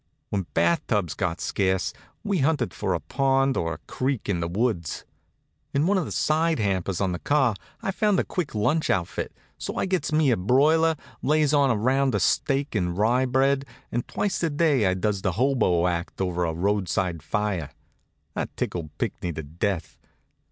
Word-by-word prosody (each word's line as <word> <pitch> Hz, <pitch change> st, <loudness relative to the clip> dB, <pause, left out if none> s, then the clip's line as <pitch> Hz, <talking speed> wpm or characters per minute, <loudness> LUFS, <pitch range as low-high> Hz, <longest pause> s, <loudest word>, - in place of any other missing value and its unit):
When 95 Hz, -4 st, -1 dB
bath 85 Hz, +1 st, +3 dB
tubs 100 Hz, -8 st, 0 dB
got 90 Hz, -2 st, -2 dB
scarce 95 Hz, -2 st, 0 dB, 0.3 s
we'd 200 Hz, -4 st, 0 dB
hunt 140 Hz, -, +1 dB
for -, -, -1 dB
a -, -, -1 dB
pond 135 Hz, 0 st, +1 dB
or 85 Hz, 0 st, -1 dB
a -, -, -7 dB
creek 130 Hz, -2 st, -2 dB
in 95 Hz, -4 st, 0 dB
the 85 Hz, -, -1 dB
woods. 90 Hz, -, -1 dB, 0.7 s
In 140 Hz, +3 st, +3 dB
one 195 Hz, +2 st, +3 dB
of 175 Hz, -, -2 dB
the -, -, -6 dB
side 160 Hz, +1 st, +2 dB
hampers 95 Hz, -4 st, -1 dB
on 95 Hz, -2 st, +1 dB
the 90 Hz, -, -3 dB
car 135 Hz, -6 st, +2 dB, 0.3 s
I 195 Hz, -, 0 dB
found 210 Hz, 0 st, +2 dB
a -, -, +2 dB
quick 170 Hz, -10 st, -3 dB
lunch 150 Hz, +10 st, +1 dB
outfit, 85 Hz, -3 st, -1 dB, 0.3 s
so -, -, -4 dB
I -, -, 0 dB
gets 185 Hz, -5 st, -1 dB
me 155 Hz, -3 st, +3 dB
a 115 Hz, -, +2 dB
broiler, 155 Hz, -, +4 dB, 0.3 s
lays 155 Hz, 0 st, +2 dB
in 145 Hz, -, +5 dB
round 130 Hz, +1 st, +2 dB
steak 140 Hz, -, +1 dB
and 90 Hz, -5 st, -1 dB
rye 120 Hz, +5 st, +3 dB
bread, 135 Hz, +2 st, +2 dB, 0.3 s
and 120 Hz, +1 st, -2 dB
twice 205 Hz, -, -1 dB
a 165 Hz, -, +1 dB
day 145 Hz, -, +2 dB
I 95 Hz, -, +2 dB
does 100 Hz, +1 st, -1 dB
the 95 Hz, -2 st, 0 dB
hobo 110 Hz, -7 st, +2 dB
act 85 Hz, 0 st, -2 dB
over 90 Hz, -2 st, 0 dB
a 80 Hz, -, -1 dB
roadside 90 Hz, -2 st, 0 dB
fire. 95 Hz, -3 st, -1 dB, 0.6 s
That -, -, -4 dB
tickled 85 Hz, -4 st, -3 dB
Pinckney 90 Hz, -, -2 dB
to 80 Hz, +1 st, -5 dB
death. 80 Hz, +2 st, -3 dB
110 Hz, 180 wpm, -25 LUFS, 90-140 Hz, 0.7 s, in